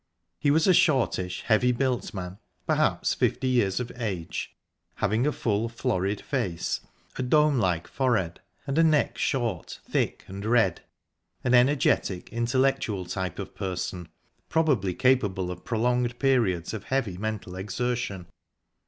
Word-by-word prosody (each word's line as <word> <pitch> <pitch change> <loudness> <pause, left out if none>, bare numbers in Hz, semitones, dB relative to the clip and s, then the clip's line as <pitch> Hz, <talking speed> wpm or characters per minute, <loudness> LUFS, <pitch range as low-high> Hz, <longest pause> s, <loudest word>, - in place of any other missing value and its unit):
He 145 - +2
was 155 +2 +4
a 185 - +6
shortish, 125 - +2
heavily 120 +3 +3
built 125 0 -1
man, 95 0 -6 0.3
perhaps - - +1
fifty 130 - 0
years 120 -6 +2
of 125 -1 -4
age, 95 -9 -4 0.4
having 115 +7 +1
a - - +3
full, 115 -3 -1
florid 100 -3 -1
face, 100 -12 -2 0.4
a - - +1
dome 150 +1 +3
like 90 -5 0
forehead, 110 -11 0 0.3
and 140 +2 0
a - - +6
neck 155 -2 +2
short, 115 - -1
thick - - -1
and 100 +1 -7
red 110 -5 +2 0.6
an 125 - +1
energetic, 125 -8 +2
intellectual 120 -4 +1
type 90 -1 -4
of - - -6
person, 90 -2 -4 0.4
probably 135 - +1
capable 105 -9 +2
of 90 0 -8
prolonged 120 +1 0
periods 115 -12 +1
of 110 -3 -6
heavy 115 -9 -1
mental 105 -4 -4
exertion. 100 -1 -3
115 Hz, 135 wpm, -27 LUFS, 95-130 Hz, 0.6 s, a